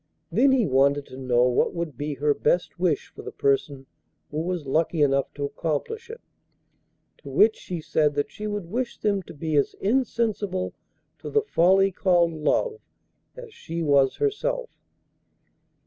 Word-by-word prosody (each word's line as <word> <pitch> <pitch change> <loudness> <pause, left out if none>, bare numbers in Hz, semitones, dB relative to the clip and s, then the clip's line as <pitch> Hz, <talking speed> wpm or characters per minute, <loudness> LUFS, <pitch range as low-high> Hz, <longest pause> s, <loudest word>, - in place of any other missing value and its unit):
Then 250 +10 +4
he 260 -4 +3
wanted 140 0 +2
to - - -10
know 125 -2 +2
what 125 +5 +2
would 170 -5 -4
be 145 +3 -4
her 145 +2 +2
best 170 +4 0
wish 175 -5 0
for - - -11
the - - -7
person 140 0 0 0.5
who 150 +1 -2
was 175 -2 -3
lucky 155 +3 +1
enough 140 -1 +1
to 145 - -2
accomplish 165 - -3
it. 465 +2 -9 1.0
To - - -11
which 440 +2 +4
she 180 - -6
said 150 -1 +1
that 145 - -1
she 215 - -6
would 205 -3 -3
wish 245 +1 -2
them 200 -2 0
to - - -12
be 155 +1 -2
as 140 - +1
insensible 215 -5 -1 0.5
to - - -7
the 435 -1 +2
folly 195 - +3
called 175 -2 +2
'love' 435 - 0 0.6
as 480 -3 -10
she 165 0 -5
was 140 -3 +3
herself! - - -1
170 Hz, 165 wpm, -25 LUFS, 145-230 Hz, 1.0 s, Then